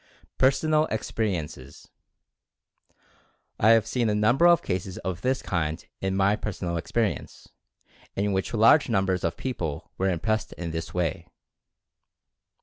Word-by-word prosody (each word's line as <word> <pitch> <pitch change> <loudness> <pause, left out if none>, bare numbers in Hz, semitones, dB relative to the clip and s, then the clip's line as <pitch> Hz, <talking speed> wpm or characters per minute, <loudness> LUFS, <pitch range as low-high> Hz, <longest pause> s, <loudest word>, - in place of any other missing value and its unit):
PERSONAL 155 +4 +3
EXPERIENCES. 85 - -4 1.7
I 110 - +4
have 115 -1 +5
seen 115 0 0
a 105 - +1
number 120 +10 +4
of 175 -1 +5
cases 95 0 -3
of 90 -2 -3
this 130 +4 0
kind 80 -3 -2
in 95 0 -1
my 100 +2 +3
personal 95 -5 -4
experience, 105 +6 -3 0.7
in 100 0 0
which 95 0 -1
large 115 +6 +5
numbers 95 -4 +1
of 85 0 -1
peo 130 - -3
ple 80 -9 -5
were 95 +1 +2
impressed 110 +5 -1
in 85 -2 -5
this 80 0 -5
way. 90 -3 -2
95 Hz, 135 wpm, -26 LUFS, 85-115 Hz, 1.7 s, have